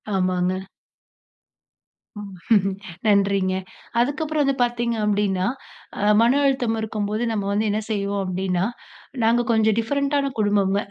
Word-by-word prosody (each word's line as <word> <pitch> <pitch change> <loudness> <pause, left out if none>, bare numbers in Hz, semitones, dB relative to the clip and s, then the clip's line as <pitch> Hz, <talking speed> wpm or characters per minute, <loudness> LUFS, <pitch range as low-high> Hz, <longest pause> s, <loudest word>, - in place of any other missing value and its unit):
ஆமாங்க. 185 0 0 2.5
நன்றிங்க. 195 -2 +2 0.5
அதுக்கப்புறம் 295 +4 0
அது 275 - +2
பாத்தீங்க 240 -1 -1
அப்டின்னா, 200 -3 +1 0.5
அ - - -2 0.2
மன 235 +2 +4
அழுத்தம் 250 -5 +1
இருக்கும்போது 215 0 -2
நம்ம 205 -3 -2
வந்து 210 +2 +1
என்ன 210 +1 0
செய்வோம் 200 -1 -1
அப்டின்னா, 185 0 -1 0.6
நாங்க 235 +2 +3
கொஞ்சம் 220 -1 +3
டிஃபரண்டான 280 +3 0
குடும்பம்ங்க. 205 -1 +2
210 Hz, 105 wpm, -23 LUFS, 195-240 Hz, 2.5 s, மன